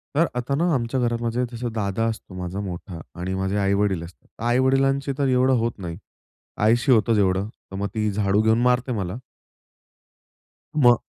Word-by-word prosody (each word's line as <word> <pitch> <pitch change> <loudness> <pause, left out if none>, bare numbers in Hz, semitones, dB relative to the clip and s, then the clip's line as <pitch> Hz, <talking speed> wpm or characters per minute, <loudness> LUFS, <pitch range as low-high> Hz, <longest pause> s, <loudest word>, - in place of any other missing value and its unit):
तर 165 +3 +4
आता 125 +3 -1
ना 170 +3 +2
आमच्या 125 0 0
घरामध्ये 120 0 0
माझा 120 0 -4
दादा 105 +1 -1
असतो, 110 -3 -7
माझा 90 +1 -5
मोठा 90 -2 -6 0.2
आणि 90 +2 -3
माझे 95 +1 -1
आईवडील 100 -3 +1
असतात. 85 +1 -13
तर - - -12
आई-वडिलांची 135 +3 +2
तर 140 -2 +1
एवढं 130 0 +3
होत 115 - +1
नाही. 85 -4 -6 0.7
आईशी 120 +4 +3
होतं 115 -1 +4
जेवढं 95 -1 +2
तर 95 - -14
मग 100 +1 -2
ती 110 -1 +1
झाडू 100 0 +2
घेऊन 110 +1 +3
मारते 125 +1 +2
मला. 95 -3 -3 1.6
मग 120 -5 +6
115 Hz, 165 wpm, -23 LUFS, 100-125 Hz, 1.6 s, मग